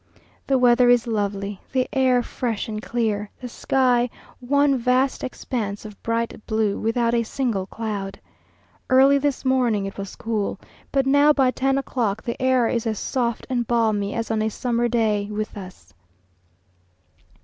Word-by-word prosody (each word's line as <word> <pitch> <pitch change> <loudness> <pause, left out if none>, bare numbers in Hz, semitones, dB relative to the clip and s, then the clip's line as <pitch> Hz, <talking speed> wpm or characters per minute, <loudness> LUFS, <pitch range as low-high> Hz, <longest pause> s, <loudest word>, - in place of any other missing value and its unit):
The 270 - +3
weather 245 0 +5
is 245 0 +4
lovely, 200 -3 -2
the 255 -1 +1
air 255 -2 +3
fresh 230 -3 -3
and 215 -1 -4
clear, 215 -4 -1
the 250 - -6
sky 245 0 +1 0.3
one 280 +2 +2
vast 255 +2 +1
expanse 220 -5 -4
of 210 -2 -11
bright 230 -1 -2
blue, 220 -2 0
without 230 +1 +1
a 235 - +3
single 230 -5 -2
cloud. 205 -3 -5 0.7
Early 270 +2 +6
this 280 -1 -1
morning 245 -6 +2
it 195 0 -7
was 195 -1 -6
cool, 215 -3 -2 0.3
but 270 -1 +2
now, 285 +2 +5
by 265 -3 +3
ten 270 +1 0
o'clock, 230 -6 -2
the 235 +1 -4
air 255 -2 +3
is 235 0 -1
as 220 -1 -1
soft 235 -1 -2
and 240 -3 -1
balmy 215 -4 +1
as 230 -1 -2
on 220 -1 0
a 220 - +1
summer 240 +1 -1
day 215 -4 0
with 215 +1 -4
us. 185 -3 -11
235 Hz, 160 wpm, -23 LUFS, 215-255 Hz, 0.7 s, Early